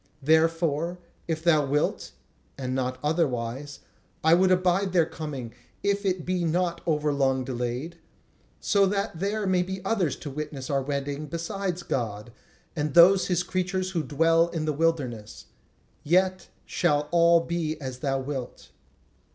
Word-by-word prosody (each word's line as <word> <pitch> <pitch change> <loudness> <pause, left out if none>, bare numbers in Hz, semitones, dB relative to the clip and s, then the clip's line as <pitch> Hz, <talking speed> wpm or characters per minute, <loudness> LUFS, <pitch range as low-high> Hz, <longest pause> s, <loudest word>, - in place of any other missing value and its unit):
Therefore 165 +2 +2 0.3
if 160 -1 -2
thou 155 -3 +4
wilt 145 +2 -1 0.4
(and 130 -2 -3
not 130 -1 -1
otherwise) 140 -3 -1 0.4
I 160 +1 +5
would 185 +2 +4
abide 185 +1 +2
their 170 -3 +4
coming 140 -8 -6 0.3
if 200 0 0
it 180 -2 -1
be 180 -1 -1
not 170 +1 0
over 150 -2 +1
long 135 -2 +1
delayed; 125 +6 -4 0.6
so 200 -2 +3
that 195 -3 -2
there 205 +2 -1
may 185 -1 +2
be 190 +1 -4
others 190 -8 +1
to 145 - -8
witness 145 -1 -5
our 135 -1 +1
wedding 140 +2 -3
besides 175 +3 -3
God, 110 -4 -3 0.4
and 150 -2 -2
those 185 +3 +7
his 180 -1 +1
creatures 185 0 -2
who 170 -3 0
dwell 165 +3 +3
in 165 -2 -3
the 155 - 0
wilderness. 140 -9 -2 0.6
Yet 185 +3 +2 0.2
shall 150 -4 +1
all 170 0 +5
be 165 -2 -3
as 130 -3 -6
thou 135 0 -1
wilt." 130 -2 -6
160 Hz, 145 wpm, -26 LUFS, 140-180 Hz, 0.6 s, those